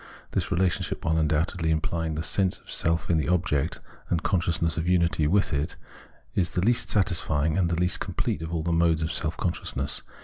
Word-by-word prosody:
This - - -1
relationship, 95 -1 0
vi'hile 80 0 +1
undoubtedly 80 +2 0
implying 80 0 -1
the 80 - -2
sense 95 +2 +1
of - - -13
self 80 0 +1
in 80 - +3
the - - -1
object 80 -4 +1 0.3
and 85 - 0
consciousness 85 -4 +1
of 85 +1 -1
unity 85 -4 +2
with 100 +1 +2
it, 70 +2 -1 0.6
is 90 -3 +1
the 90 - -1
least 115 +5 +2
satisfying 80 -6 +1
and 90 -3 +2
the 85 - 0
least 90 0 +2
complete - - -2
of 80 0 -5
all 80 -2 -1
the 85 - -1
modes 80 -1 +3
of 80 - -1
self 80 -1 -1
consciousness. 85 - -2
85 Hz, 195 wpm, -26 LUFS, 80-90 Hz, 0.6 s, in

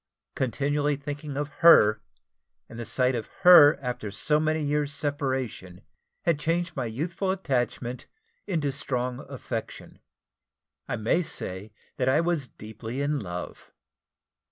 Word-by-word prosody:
Continually 145 +3 0
thinking 145 0 -6
of 145 0 -2
her, 110 -11 +7 0.7
and 115 - -10
the 115 - -5
sight 130 0 +1
of 115 -3 -3
her 165 -5 +9
after 125 -4 -3
so 150 +9 +1
many 155 0 0
years' 145 0 0
separation, 130 -11 -3 0.4
had 165 -4 +1
changed 170 +3 -1
my 130 - -2
youthful 170 - -3
attachment 130 -8 -2 0.4
into 155 -6 0
strong 125 -2 -3
affection. 125 -4 -6 0.9
I - - -2
may 115 +10 +1
say 100 - -4 0.3
that 130 0 +1
I 135 - +4
was 165 -5 0
deeply 110 +3 -8
in 145 +1 0
love. 90 -5 -7
140 Hz, 130 wpm, -26 LUFS, 120-150 Hz, 0.9 s, her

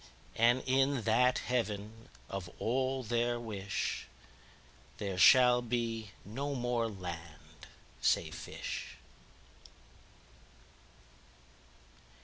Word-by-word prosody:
33And 120 +3 +4
in 135 0 +2
that 125 +3 +3
Heaven 115 -1 -3 0.2
of 95 -3 -5
all 130 +2 0
their 120 +1 0
wish,34There 95 - -6
shall 125 +4 +7
be 115 -2 -2 0.2
no 140 +7 -3
more 120 -2 0
land, 85 -6 -9 0.3
say 80 -2 +2
fish. 80 -2 -6
115 Hz, 75 wpm, -33 LUFS, 95-125 Hz, 0.3 s, shall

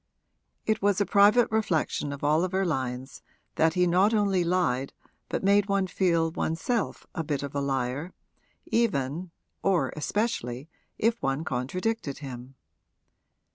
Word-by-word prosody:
It 220 -1 +1
was 200 -1 +2
a 205 - +2
private 210 +5 +5
reflection 190 -9 0
of 140 0 -7
Oliver 180 +6 +2
Lyon's 130 -4 -3 0.3
that 160 0 +2
he 180 0 +4
not 185 +5 +3
only 200 -4 +2
lied 170 -7 0 0.4
but - - -2
made 200 +1 +4
one 200 -1 +2
feel 170 -3 +1
one's 160 0 -2
self 235 0 -2
a 165 - -2
bit 145 -3 -2
of 140 - -5
a 140 - -1
liar, 135 +4 -2 0.5
even 170 - 0 0.3
(or 195 -3 +1
especially) 150 - -2 0.3
if 230 +1 +1
one 135 +3 -1
contradicted 155 - -2
him. 130 -2 -8
170 Hz, 135 wpm, -27 LUFS, 140-200 Hz, 0.5 s, private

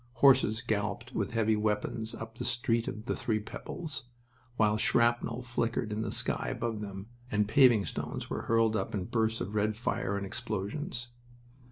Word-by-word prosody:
Horses 125 -3 +5
galloped 115 +3 -2
with - - -1
heavy 110 -1 +3
wagons 105 +1 -1
up 115 0 -7
the 115 - -5
Street 120 -1 +1
of 105 +1 -5
the - - -1
Three 110 -2 0
Pebbles, 155 +7 -5 0.5
while 105 -1 +4
shrapnel 120 +2 +2
flickered 115 -2 -1
in 105 - -2
the - - -2
sky - - -1
above 115 -2 -2
them 100 -1 -6 0.2
and 105 -2 +2
paving 120 -3 +6
stones - - -4
were - - -3
hurled 115 -1 +4
up 100 0 -1
in 95 - -1
bursts 110 +1 0
of 95 +4 -4
red 105 0 +1
fire 100 -3 -1
and 100 - -3
explosions. 120 - -4
110 Hz, 170 wpm, -31 LUFS, 105-120 Hz, 0.5 s, paving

